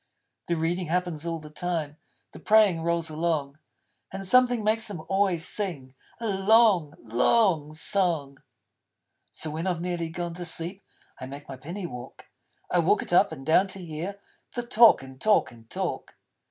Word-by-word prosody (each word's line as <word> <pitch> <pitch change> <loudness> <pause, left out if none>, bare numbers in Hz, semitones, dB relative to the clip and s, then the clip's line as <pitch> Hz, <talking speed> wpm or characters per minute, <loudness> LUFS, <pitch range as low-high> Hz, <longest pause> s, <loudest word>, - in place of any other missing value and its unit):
The 170 - +1
reading 170 +2 -1
happens 170 -2 -2
all 165 0 -2
the 155 -1 -11
time; 160 -3 -3 0.4
The - - -12
praying 210 -6 +4
rolls 170 -1 -1
along; 155 -3 -2 0.5
And 195 0 -6
something 245 0 +4
makes 220 +1 +1
them 180 -7 -7
always 190 -3 +1
sing 165 -13 -3 0.3
A 230 - -5
long, 195 -5 +3
long 150 - +2
song. 160 -5 0 0.9
So 155 - -5
when 160 +4 -3
I've 180 -3 -1
nearly 175 -1 -3
gone 170 +1 -4
to 175 +1 -7
sleep, 175 +3 -2 0.4
I 130 - -6
make 140 +2 -10
my 135 - -7
Penny 170 +9 -7
walk. 125 -7 -9 0.4
I - - +3
walk - - +2
it - - -5
up - - +5
and 135 - -8
down, 180 +6 +4
to 190 -2 -5
hear 170 +5 -6 0.4
The 240 - -2
talk 230 - +6
and 130 0 -13
talk 215 -1 +3
and 115 -2 -17
talk. - - -4
170 Hz, 165 wpm, -26 LUFS, 155-195 Hz, 0.9 s, talk